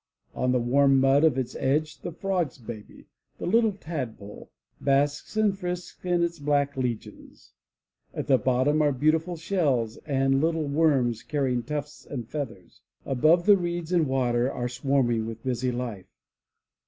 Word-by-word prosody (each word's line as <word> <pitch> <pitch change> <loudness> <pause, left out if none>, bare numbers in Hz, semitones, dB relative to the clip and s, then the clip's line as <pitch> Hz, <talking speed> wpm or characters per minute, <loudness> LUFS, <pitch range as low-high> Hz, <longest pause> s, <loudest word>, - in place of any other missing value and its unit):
On 125 0 0
the 125 - +3
warm 135 +3 +4
mud 135 +2 +4
of 155 -5 +4
its 130 -2 -3
edge 150 +3 0
the 175 - -5
Frog's 180 -5 -2
baby, 115 -3 -10 0.3
the - - -5
little 225 +2 +3
Tadpole, 130 - -7 0.3
basks 145 +7 0
and 210 -2 +3
frisks 180 -2 -6
in 175 -1 +1
its 170 -1 -2
black 145 -1 +1
legions. 125 -4 -5 0.6
At - - -4
the 130 -2 +4
bottom 130 +4 +2
are 145 -1 +3
beautiful 160 +6 +1
shells 140 - 0
and 135 -1 +1
little 160 -1 +1
worms 140 -6 +2
carrying 135 -4 -1
tufts 145 +4 -6
and 120 -6 -5
feathers. 115 - -7 0.2
Above, 155 +7 +3
the 205 -1 +7
reeds 175 -2 -3
and 170 -4 +3
water 125 -1 +1
are 120 - -3
swarming 120 -3 0
with 115 0 -8
busy 125 0 -1
life. 120 -6 -5
140 Hz, 155 wpm, -26 LUFS, 125-160 Hz, 0.6 s, the